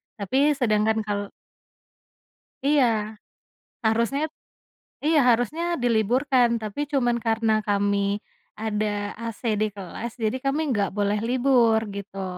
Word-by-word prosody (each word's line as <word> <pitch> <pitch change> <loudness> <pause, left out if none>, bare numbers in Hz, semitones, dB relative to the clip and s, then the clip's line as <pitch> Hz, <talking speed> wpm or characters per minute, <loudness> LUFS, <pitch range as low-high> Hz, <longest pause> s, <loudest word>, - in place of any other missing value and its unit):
tapi 270 +9 +2
sedangkan 220 -3 +1
kal 205 -1 -3 1.4
Iya, 290 -3 +5 1.0
harusnya 230 +6 +1 0.8
iya 315 0 +4
harusnya 245 +8 +2 0.2
diliburkan 245 +3 +3
tapi 215 +6 -5
cuman 240 -3 +2
karena 225 0 +2
kami, 200 0 +1 0.6
ada 215 -1 -1 0.4
AC 230 -2 -6 0.2
di 215 - +3
kelas 200 +4 -6
jadi 220 +4 +1
kami 275 +3 +1
enggak 205 -6 0
boleh 205 0 +1
libur 245 -3 +3 0.2
gitu. 195 -1 -6
225 Hz, 105 wpm, -24 LUFS, 210-260 Hz, 1.4 s, Iya